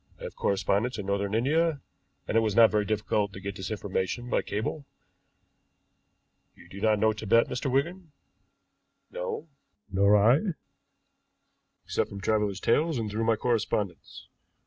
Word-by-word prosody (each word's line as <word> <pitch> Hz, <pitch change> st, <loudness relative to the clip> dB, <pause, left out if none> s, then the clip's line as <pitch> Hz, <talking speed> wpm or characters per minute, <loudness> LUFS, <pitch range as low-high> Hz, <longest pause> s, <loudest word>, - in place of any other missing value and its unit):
I -, -, -11 dB
have -, -, -7 dB
correspondents 100 Hz, +5 st, 0 dB
in 100 Hz, -, -5 dB
Northern 100 Hz, +1 st, -1 dB
India, 150 Hz, +6 st, +1 dB, 0.5 s
and -, -, -2 dB
it -, -, +6 dB
was 110 Hz, -3 st, 0 dB
not 115 Hz, -1 st, +7 dB
very 105 Hz, -1 st, +1 dB
difficult 105 Hz, -1 st, -1 dB
to -, -, -8 dB
get 100 Hz, +1 st, -5 dB
this 95 Hz, 0 st, -5 dB
information 105 Hz, +3 st, -3 dB
by -, -, +2 dB
cable. 110 Hz, +8 st, -4 dB, 1.7 s
You -, -, -17 dB
do 100 Hz, +3 st, -10 dB
not 110 Hz, -1 st, +3 dB
know 110 Hz, +1 st, +3 dB
Tibet, 110 Hz, +2 st, +3 dB
Mr. 125 Hz, +2 st, -2 dB
Wigan?" 165 Hz, +5 st, -1 dB, 1.0 s
"No." -, -, -5 dB, 0.4 s
"Nor 100 Hz, +2 st, +4 dB
I, 115 Hz, +7 st, +5 dB, 1.5 s
except -, -, -1 dB
from 100 Hz, -, -8 dB
travelers' 105 Hz, -1 st, 0 dB
tales 155 Hz, +5 st, +2 dB
and 110 Hz, -3 st, -3 dB
through 110 Hz, +2 st, -1 dB
my 115 Hz, 0 st, +3 dB
correspondents. 105 Hz, -, -2 dB
110 Hz, 145 wpm, -28 LUFS, 100-125 Hz, 1.7 s, not